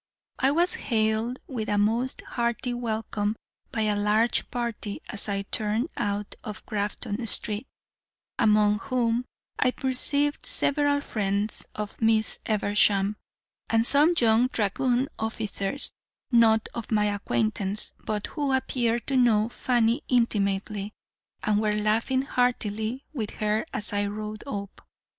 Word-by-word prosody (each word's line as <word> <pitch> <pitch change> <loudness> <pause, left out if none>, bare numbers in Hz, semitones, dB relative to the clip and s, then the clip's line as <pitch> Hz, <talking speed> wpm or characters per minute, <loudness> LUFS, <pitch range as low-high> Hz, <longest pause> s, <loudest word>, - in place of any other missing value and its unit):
I 265 - +4
was 345 +5 +2
hailed 220 +1 0
with 225 -5 -4
a 205 - +1
most 230 +5 +1
hearty 235 +1 -2
welcome 220 -3 -2 0.4
by 225 - -1
a 210 -1 +1
large 210 +3 +2
party 235 -4 -3
as 210 0 +1
I 200 0 -1
turned 215 +8 -1
out 205 0 -2
of 215 0 -7
Grafton 205 +1 -3
Street, 215 +3 0 0.7
among 210 -1 +4
whom 240 0 0 0.3
I 255 - +4
perceived 285 +3 +1
several 285 0 +2
friends 205 -3 -2
of 210 +1 -6
Miss 220 -1 +2
Eversham, 205 -1 +2 0.5
and 225 0 +3
some 295 +7 +4
young 230 +1 +4
dragoon 245 +3 0
officers, 220 +2 +1 0.4
not 225 -2 +5
of 235 -2 -6
my 210 -2 +2
acquaintance, 205 -1 0
but 210 -1 -2
who 285 -3 -2
appeared 240 -3 0
to 275 - -1
know 230 -3 +4
Fanny 240 -2 +1
intimately, 205 -3 0 0.5
and 210 0 +2
were 210 -1 +1
laughing 225 +5 +1
heartily 245 -1 -1
with 220 -7 -3
her 215 +1 0
as 210 - -3
I 205 0 +1
rode 210 +1 -5
up. 200 -5 -6
220 Hz, 130 wpm, -26 LUFS, 210-245 Hz, 0.7 s, not